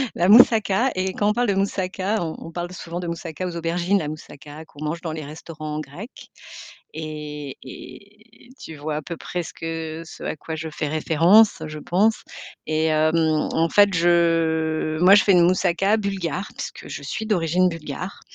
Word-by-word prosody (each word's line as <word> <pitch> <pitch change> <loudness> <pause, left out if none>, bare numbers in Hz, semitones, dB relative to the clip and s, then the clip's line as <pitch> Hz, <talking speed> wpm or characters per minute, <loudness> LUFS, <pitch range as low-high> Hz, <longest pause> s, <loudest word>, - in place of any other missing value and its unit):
La 175 - +2
moussaka 225 +1 +5
et 185 0 -2
quand 205 +2 +1
on - - +4
parle 245 +2 +1
de 200 - +2
moussaka, 195 +1 -1
on 160 -2 -3
on 165 - -9
parle 175 +1 -4
d 180 - -12
souvent 175 -1 -6
de 180 - -5
moussaka 170 +1 -5
aux 175 - -6
aubergines. 170 +4 0
La 150 - -3
moussaka 150 0 -10
qu'on 145 -1 -11
mange 155 +3 -2
dans 165 -2 -5
les 155 -1 -5
restaurants 155 +1 -7
grecs 155 - -10 0.7
et 150 -3 -6
et 210 - -14
tu 160 - -9
vois 150 +1 -4
à 155 - -4
peu 170 +3 -6
près 175 +2 -4
ce 165 - -9
que 165 0 -5
ce - - -12
à - - -3
quoi 160 +2 -6
je 160 +1 -5
fais 150 - -3
référence, 165 +7 +4
je 155 0 -7
pense 205 +8 +1 0.4
et 155 0 0
hem, 155 +1 +2 0.4
en 165 +1 +2
fait, 205 -1 +5
je 165 -2 +2
moi 190 +3 +8
je 210 - +5
fais 200 - +5
une 175 -2 +6
moussaka 185 +3 +2
bulgare. 195 -3 -3
Puisque - - -7
je - - -7
suis 220 - -4
d'origine 180 -3 +2
bulgare 165 +2 -6
170 Hz, 190 wpm, -23 LUFS, 155-195 Hz, 0.7 s, moi